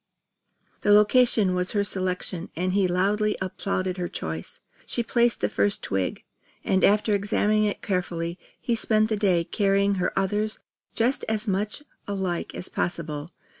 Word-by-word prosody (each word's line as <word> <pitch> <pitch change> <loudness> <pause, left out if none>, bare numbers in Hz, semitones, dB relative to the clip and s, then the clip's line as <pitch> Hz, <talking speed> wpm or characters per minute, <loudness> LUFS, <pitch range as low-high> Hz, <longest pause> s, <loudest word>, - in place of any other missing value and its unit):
The - - 0
location 210 -1 +5
was 180 0 -1
her 205 -1 +2
selection 185 -2 -3
and 185 +2 -1
he 195 -1 +3
loudly 205 +4 +1
applauded 185 0 -2
her 180 -1 -2
choice. 80 - -5 0.3
She 235 - 0
placed 235 0 +2
the - - +2
first 205 -1 0
twig, 95 -2 -2 0.4
and 190 0 +1
after 210 +1 +4
examining 210 +1 +2
it 205 - -2
carefully, 175 -3 -2 0.2
he 240 - -1
spent 215 -1 +2
the 220 - +1
day 190 -5 +2
carrying 200 0 +1
her - - +1
others 210 +3 0 0.4
just 240 +4 +1
as 220 0 -2
much 205 +7 -1 0.2
alike 190 -4 -3
as - - -6
possible. 155 -3 -3
195 Hz, 150 wpm, -25 LUFS, 180-210 Hz, 0.4 s, location